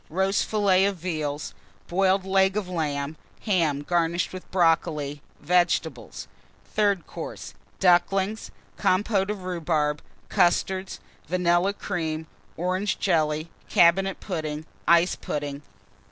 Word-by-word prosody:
Roast 190 +4 +1
Fillet 200 -3 +3
of 200 0 0
Veal. 155 -4 -3 0.5
Boiled 190 +1 +2
Leg 190 +1 +3
of 205 -3 -2
Lamb. 150 -4 -2 0.2
Ham, 165 -9 +1
garnished 170 +2 0
with 185 - -9
Brocoli. 160 -5 +1 0.2
Vegetables. 170 -6 0 0.5
THIRD 200 -4 +2
COURSE. - - -7 0.3
Ducklings. 195 +3 +2 0.3
Compôte 195 +1 +2
of 205 -3 -4
Rhubarb. 160 -4 -1 0.3
Custards. 185 +2 +1 0.3
Vanilla 175 +2 +2
Cream. 160 -6 -3 0.3
Orange 185 +4 -1
Jelly. 155 -3 0 0.2
Cabinet 190 +3 +4
Pudding. 155 -5 -4 0.2
Ice 170 +1 +5
Pudding. 145 -1 -4
175 Hz, 105 wpm, -25 LUFS, 155-190 Hz, 0.5 s, Ice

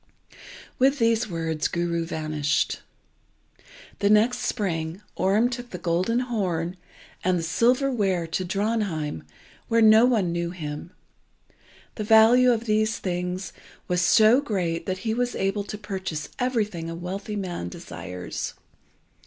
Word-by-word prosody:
With 270 +2 +4
these 230 -2 +2
words 165 -2 -1
Guru 170 -1 -1
vanished. 155 -2 -1 1.2
The 200 - +2
next 215 +4 +4
spring 165 -5 -2 0.2
Orm 205 +5 +3
took 245 0 -6
the 180 - -6
golden 185 +7 0
horn 185 -8 -2 0.5
and 185 0 +2
the 165 - -2
silver 250 - +2
ware 190 -8 0
to 165 +3 -2
Drontheim 190 - -1 0.5
where 230 - +2
no 220 +2 +7
one 215 -9 +2
knew 170 0 -2
him. 155 -2 -6 1.1
The 215 - -2
value 225 +4 +6
of 235 -1 -1
the 215 -1 +3
things 180 -3 -3 0.3
was 180 0 +1
so 215 +8 +5
great 180 -10 -2
that 185 -1 -1
he 220 - +1
was 245 +1 -1
able 195 +1 0
to 210 - -6
purchase 190 -7 -5
everything 210 -10 -1
a 165 - -5
wealthy 195 +5 -5
man 180 - -4
desires. 90 0 -6
195 Hz, 135 wpm, -25 LUFS, 170-225 Hz, 1.2 s, no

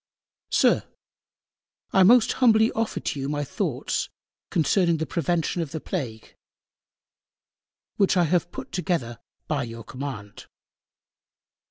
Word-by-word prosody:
SIR, - - +4 1.1
I 190 - +5
Most 225 +4 +6
humbly 220 -2 +5
offer 225 0 -2
to 145 - -3
You 135 +1 -3
my 145 0 -1
Thoughts 140 - -2 0.4
concerning 170 +1 +2
the 160 - -2
Prevention 170 +1 -1
of 160 - -3
the 160 - -3
Plague, 125 - -5 1.6
which 195 -1 +3
I 175 - +5
have 175 +1 +1
put - - -8
together 155 -10 -2 0.3
_by 140 -6 -1
your 115 0 -8
Command. 125 -7 -7
165 Hz, 120 wpm, -25 LUFS, 135-185 Hz, 1.6 s, Most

